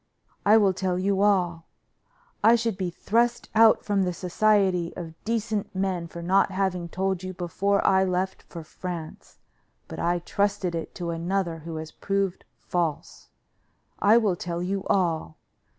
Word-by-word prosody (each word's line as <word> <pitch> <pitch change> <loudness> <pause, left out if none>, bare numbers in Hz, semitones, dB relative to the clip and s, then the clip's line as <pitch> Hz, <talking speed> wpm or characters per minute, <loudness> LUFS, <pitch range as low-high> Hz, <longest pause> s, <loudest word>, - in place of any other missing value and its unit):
I 215 +2 +7
will 200 -3 +4
tell 185 -1 -1
you 195 +1 +1
all: 180 -5 +1 0.8
I 225 +2 +7
should 230 -3 -1
be 185 -2 -2
thrust 235 +7 0
out 225 0 +5
from 200 -2 +1
the 180 -1 0
society 185 -1 +2
of 165 -2 -7
decent 220 -3 -2
men 185 -3 -1
for 170 +1 -8
not 190 +4 +3
having 185 -3 -1
told 190 +1 -1
you 185 0 -6
before 195 +3 0
I 190 0 +4
left 185 0 -1
for 170 -2 -10
France, 165 0 -8 0.5
but - - -8
I 175 +1 +1
trusted 200 +1 -1
it 165 -1 -5
to 170 -2 -3
another 170 0 -2
who 165 +1 -7
has 155 0 -6
proved 195 -2 -2
false. 170 -4 -3 0.7
I 215 +3 +5
will 210 -6 +2
tell 175 0 -4
you 190 +1 -2
all. 165 - 0
185 Hz, 155 wpm, -26 LUFS, 175-200 Hz, 0.8 s, I